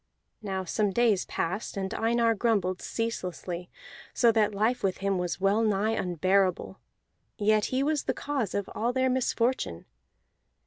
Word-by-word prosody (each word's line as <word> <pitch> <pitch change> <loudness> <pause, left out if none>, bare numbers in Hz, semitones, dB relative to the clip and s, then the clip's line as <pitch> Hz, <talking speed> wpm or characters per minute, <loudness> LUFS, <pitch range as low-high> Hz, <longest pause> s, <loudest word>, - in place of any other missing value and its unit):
Now 190 -3 -3
some 210 +3 0
days 215 -2 +2
passed, 190 +5 -3
and 190 +2 -3
Einar 230 0 +2
grumbled 200 -5 0
ceaselessly, 180 -5 -4 0.5
so 235 -2 +5
that 215 -2 +1
life 220 +5 +1
with 190 -2 0
him 195 -1 0
was 180 0 -2
well 195 +3 +2
nigh 215 0 +1
unbearable; 185 -1 0 0.6
yet 215 0 +3
he 260 +1 0
was 300 0 0
the - - 0
cause 275 -9 -2
of 200 -1 -1
all 235 +3 -1
their 260 0 +2
misfortune. 245 - 0
210 Hz, 145 wpm, -28 LUFS, 190-230 Hz, 0.6 s, so